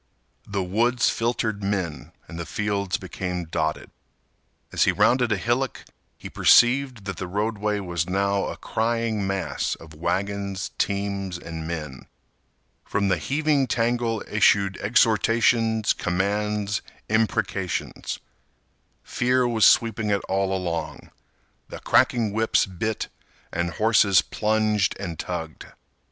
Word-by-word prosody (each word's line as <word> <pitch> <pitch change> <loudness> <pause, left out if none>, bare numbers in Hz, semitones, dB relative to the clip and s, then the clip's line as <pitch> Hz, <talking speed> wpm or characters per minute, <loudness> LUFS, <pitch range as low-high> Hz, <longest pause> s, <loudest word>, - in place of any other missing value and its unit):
The 100 -2 -2
woods 120 +6 +2
filtered 115 -3 -1
men 100 -5 -3 0.2
and 85 - -8
the 85 - -4
fields 100 -2 -1
became 90 -1 -4
dotted. 80 -1 -2 0.8
As - - +3
he - - +4
rounded 125 -2 +3
a 105 - +2
hillock, 120 +5 -1 0.3
he - - -8
perceived 125 -3 +4
that 100 -4 -5
the 95 - -4
roadway 105 +2 -1
was 85 -2 -2
now 100 +1 +1
a - - -5
crying 115 -2 -1
mass 95 -1 -2
of 80 -1 -14
wagons, 95 +4 -2
teams, 100 -2 -1
and 80 -2 -7
men. 75 -6 -6 0.8
From 100 -1 -1
the 95 -3 +1
heaving 145 - +1
tangle 115 -1 0
issued 100 -2 +3
exhortations, 115 0 +3
commands, 100 +2 -1 0.3
imprecations. 105 -4 -1 0.9
Fear 125 0 +1
was 110 -2 +5
sweeping 110 -2 +3
it 100 -2 +1
all 95 0 0
along. 90 -3 -4 0.6
The - - -8
cracking 115 -4 +2
whips 110 +1 +2
bit 100 +4 -3 0.5
and 85 0 -1
horses 110 -2 +4
plunged 110 -2 +1
and 85 -5 -5
tugged. 80 -4 -5
100 Hz, 120 wpm, -24 LUFS, 95-115 Hz, 0.9 s, was